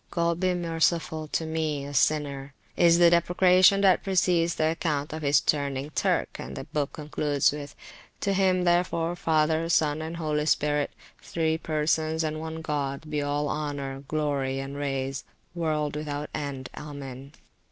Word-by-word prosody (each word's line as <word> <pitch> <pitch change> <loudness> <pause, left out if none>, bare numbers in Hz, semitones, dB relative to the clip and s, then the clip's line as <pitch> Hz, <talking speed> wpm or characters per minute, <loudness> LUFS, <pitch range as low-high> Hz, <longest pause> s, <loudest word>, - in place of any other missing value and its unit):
God 170 -1 0
be 185 -1 +1
merciful 165 -2 0
to 160 - -2
me 155 -3 -2
a 145 - -7
Sinner! 140 -1 0 0.2
is 170 -1 +5
the 170 -1 +6
deprecation 180 +3 +5
that 190 -2 +5
precedes 180 -3 +2
the 155 0 +1
account 155 -3 -2
of 155 - -5
his 145 0 +4
turning 140 -1 -1
Turk, - - 0
and - - -7
the - - -5
book 145 -2 -3
concludes 150 -1 0
with, 145 -1 -7 0.5
To 200 - +1
him, 185 -2 +2
therefore, 175 -1 +1
Father, 160 -1 +1
Son, 155 -2 +2
and 160 +1 -5
Holy 150 -2 -1
Spirit, 150 -1 +1 0.3
Three 160 -1 -1
[p.360] - - -31
Persons 155 +1 0
and 155 0 -2
one 160 0 -5
God, 145 0 -3
be 150 -1 0
all 145 +1 -1
Honour, 140 -3 -4
Glory, 140 -3 -1
and 135 +1 -5
Praise, 135 -1 -3 0.3
world 155 -4 -1
without 150 -1 -4
end. 140 -3 -5
Amen. 140 -2 -8
155 Hz, 160 wpm, -27 LUFS, 145-165 Hz, 0.5 s, the